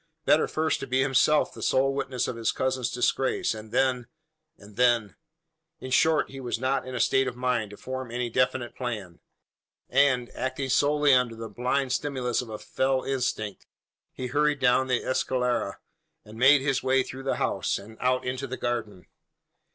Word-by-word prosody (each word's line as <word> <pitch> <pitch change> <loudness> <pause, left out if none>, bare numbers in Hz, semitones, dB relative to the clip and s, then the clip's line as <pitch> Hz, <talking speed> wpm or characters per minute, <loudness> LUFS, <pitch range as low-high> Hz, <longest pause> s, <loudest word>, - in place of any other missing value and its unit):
Better 155 - +4
first 160 0 0
to 135 - -6
be 130 +1 +2
himself 135 +3 +3
the - - -10
sole 135 +1 +2
witness 130 -2 -2
of - - -3
his 115 -1 0
cousin's 130 -2 -1
disgrace; 125 +1 0
and 110 0 -10
then 125 -2 +1 0.5
and 100 0 -15
then 120 -4 +2 0.6
In 130 - -7
short, 160 +3 +3
he 135 - -8
was 120 -3 -3
not 130 +2 -1
in 130 - -6
a - - -2
state 135 +3 +3
of 125 - -4
mind 125 -3 -1
to 105 - -11
form 130 -1 -6
any 120 +1 -2
definite 125 +1 0
plan; 105 -9 -5 0.7
and, 130 -2 +2
acting 130 +1 -3
solely 145 +2 +3
under 125 -2 +2
the 115 0 -7
blind 125 +5 -1
stimulus 130 -3 -1
of 125 - -9
a 110 - -5
fell 130 +3 -1
instinct, 125 -6 -3 0.4
he 130 - -6
hurried 145 +3 +1
down 130 0 +3
the 125 -1 0
escalera, 125 -5 0 0.5
and 105 - -12
made 135 +2 +6
his 135 -1 0
way 130 0 +2
through 130 - -8
the 135 - -1
house, - - -1
and 105 +3 -11
out 130 0 +1
into 130 +2 -3
the 130 - -5
garden. 115 -6 -3
130 Hz, 180 wpm, -27 LUFS, 120-135 Hz, 0.7 s, made